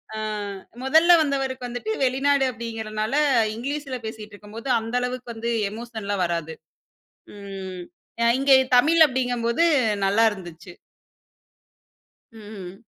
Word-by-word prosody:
அ -, -, -5 dB, 0.7 s
முதல்ல 320 Hz, +6 st, +5 dB
வந்தவருக்கு 265 Hz, -3 st, -2 dB
வந்துட்டு 240 Hz, -2 st, -6 dB, 0.2 s
வெளிநாடு 270 Hz, +1 st, +2 dB
அப்பிடீங்கிறனால, 225 Hz, -1 st, -4 dB, 0.4 s
இங்கிலீஷில 275 Hz, +2 st, -4 dB
பேசிக்கிட்டுருக்கும்போது 215 Hz, +1 st, -9 dB
அந்த 225 Hz, +2 st, -5 dB
அளவுக்கு 250 Hz, -1 st, -4 dB
வந்து 230 Hz, +1 st, -4 dB, 0.2 s
எமோஷன்லாம் 215 Hz, -4 st, -4 dB
வராது. 165 Hz, -2 st, -3 dB, 0.8 s
ம் 190 Hz, -2 st, -7 dB, 0.4 s
அ -, -, +4 dB
இங்க 275 Hz, 0 st, +4 dB, 0.3 s
தமிழ் 320 Hz, +6 st, +4 dB
அப்பிடீங்கம்போது, 245 Hz, +1 st, 0 dB, 0.4 s
நல்லா 215 Hz, +4 st, +3 dB
இருந்துச்சு. 175 Hz, -2 st, -11 dB, 1.6 s
ம். 205 Hz, -2 st, -11 dB
230 Hz, 95 wpm, -24 LUFS, 205-260 Hz, 1.6 s, முதல்ல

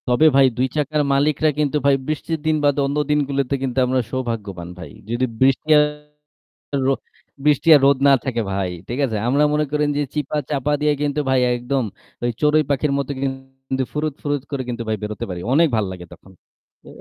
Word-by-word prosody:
তবে 125 Hz, +5 st, +3 dB
ভাই 135 Hz, -1 st, +7 dB
২ 130 Hz, +1 st, +2 dB
চাকার 150 Hz, 0 st, 0 dB
মালিকরা 150 Hz, +2 st, +2 dB
কিন্তু 150 Hz, 0 st, +1 dB
ভাই 140 Hz, -1 st, +5 dB
বৃষ্টির 155 Hz, +1 st, -2 dB
দিন 155 Hz, 0 st, +2 dB
বাদে 145 Hz, 0 st, +2 dB
অন্য 140 Hz, +2 st, -2 dB
দিনগুলোতে 140 Hz, -2 st, 0 dB
কিন্তু 130 Hz, -1 st, -3 dB
আমরা 130 Hz, +1 st, +1 dB
সৌভাগ্যবান 110 Hz, -9 st, -4 dB
ভাই। 90 Hz, -, -9 dB, 0.2 s
যদি 120 Hz, +2 st, 0 dB, 0.2 s
বৃষ্টি 135 Hz, +3 st, +2 dB
আরো 150 Hz, -2 st, -3 dB, 0.5 s
বৃষ্টি 150 Hz, +2 st, +3 dB
আর 145 Hz, -, +4 dB
রোদ 140 Hz, 0 st, +5 dB
না 140 Hz, -, +7 dB
থাকে 120 Hz, -3 st, -1 dB
ভাই। 95 Hz, -2 st, -1 dB, 0.2 s
ঠিক 120 Hz, +3 st, -3 dB
আছে? 110 Hz, -4 st, -3 dB
আমরা 140 Hz, +3 st, +3 dB
মনে 150 Hz, 0 st, +1 dB
করেন 150 Hz, 0 st, +1 dB
যে -, -, +1 dB
চিপা-চাপা 145 Hz, -1 st, -1 dB
দিয়ে 150 Hz, 0 st, +3 dB
কিন্তু 145 Hz, 0 st, 0 dB
ভাই 130 Hz, -1 st, +3 dB
একদম 125 Hz, +2 st, -1 dB, 0.4 s
ওই 120 Hz, -, +1 dB
চড়ুই 150 Hz, +1 st, +4 dB
পাখির 140 Hz, +1 st, +1 dB
মতো 140 Hz, 0 st, -3 dB
কিন্তু 135 Hz, 0 st, -4 dB
ফুরুৎ, 150 Hz, 0 st, -1 dB
ফুরুৎ 145 Hz, -2 st, -2 dB
করে 140 Hz, -2 st, -2 dB
কিন্তু 120 Hz, -1 st, -3 dB
ভাই 110 Hz, -, 0 dB
বেরোতে 105 Hz, -1 st, -4 dB
পারি। 90 Hz, -1 st, -5 dB
অনেক 165 Hz, +4 st, +5 dB
ভাল 110 Hz, -2 st, +1 dB
লাগে 90 Hz, -1 st, -8 dB
তখন। 95 Hz, -, -17 dB, 0.5 s
তো -, -, -19 dB
140 Hz, 185 wpm, -21 LUFS, 125-150 Hz, 0.5 s, ভাই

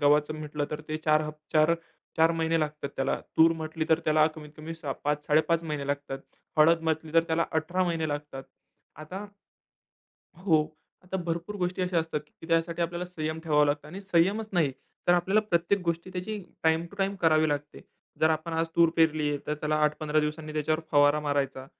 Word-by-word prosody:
गव्हाचं 150 Hz, +1 st, +3 dB
म्हटलं 150 Hz, -1 st, -3 dB
तर 150 Hz, 0 st, -4 dB
ते 155 Hz, -, -1 dB
4 155 Hz, 0 st, +4 dB
हफ 150 Hz, 0 st, -5 dB, 0.2 s
4 155 Hz, +1 st, +5 dB, 0.4 s
4 160 Hz, +1 st, +5 dB
महिने 165 Hz, 0 st, +1 dB
लागतात 150 Hz, -1 st, -3 dB
त्याला. 135 Hz, 0 st, 0 dB, 0.2 s
तूर 165 Hz, +1 st, +7 dB
म्हटली 160 Hz, 0 st, -3 dB
तर 160 Hz, -1 st, +4 dB
त्याला 155 Hz, 0 st, +4 dB
कमीत 150 Hz, -1 st, -10 dB
कमी 160 Hz, +2 st, -7 dB
6 145 Hz, -4 st, -4 dB
5-5.30 150 Hz, +3 st, +2 dB
महिने 150 Hz, -3 st, -3 dB
लागतात. 140 Hz, -1 st, -3 dB, 0.4 s
हळद 165 Hz, +2 st, +6 dB
म्हटली 160 Hz, -1 st, -1 dB
तर 165 Hz, -, +6 dB
त्याला 165 Hz, 0 st, +1 dB
18 175 Hz, +4 st, 0 dB
महिने 165 Hz, -3 st, -1 dB
लागतात 145 Hz, -2 st, -5 dB, 0.6 s
आता 185 Hz, +7 st, -7 dB, 1.1 s
हो. 160 Hz, -4 st, +1 dB, 0.3 s
आता 190 Hz, +1 st, -3 dB
भरपूर 170 Hz, +5 st, -3 dB
गोष्टी 180 Hz, 0 st, -1 dB
अशा 180 Hz, -2 st, +1 dB
असतात 160 Hz, -2 st, -2 dB, 0.2 s
की -, -, -10 dB
त्यासाठी 165 Hz, +1 st, +1 dB
आपल्याला 170 Hz, +1 st, -2 dB
संयम 155 Hz, -3 st, -4 dB
ठेवावं 150 Hz, -2 st, +4 dB
लागतं. 145 Hz, +1 st, -1 dB
आणि 185 Hz, +5 st, -7 dB
संयमच 200 Hz, +3 st, +1 dB
नाही 160 Hz, -7 st, +2 dB, 0.4 s
तर 175 Hz, -, +8 dB
आपल्याला 185 Hz, +4 st, +3 dB
प्रत्येक 200 Hz, -1 st, +1 dB
गोष्टी 170 Hz, +2 st, -2 dB
त्याची 190 Hz, +4 st, -4 dB, 0.2 s
टाईम 160 Hz, +1 st, +3 dB
टू -, -, -14 dB
टाईम 195 Hz, 0 st, 0 dB
करावी 155 Hz, -2 st, +4 dB
लागते. 145 Hz, 0 st, -3 dB, 0.4 s
जर 160 Hz, 0 st, +5 dB
आपण 160 Hz, +2 st, -2 dB
आज 165 Hz, 0 st, +1 dB
तूर 170 Hz, -1 st, +6 dB
पेरली 155 Hz, -2 st, +3 dB
आहे, 145 Hz, -, -1 dB
तर 150 Hz, -, 0 dB
त्याला 150 Hz, 0 st, -1 dB
8-15 150 Hz, 0 st, +1 dB
दिवसांनी 155 Hz, 0 st, -3 dB
त्याच्यावर 155 Hz, +1 st, 0 dB
फवारा 145 Hz, +1 st, +5 dB
मारायचा 140 Hz, -3 st, -1 dB
160 Hz, 185 wpm, -28 LUFS, 150-170 Hz, 1.1 s, तर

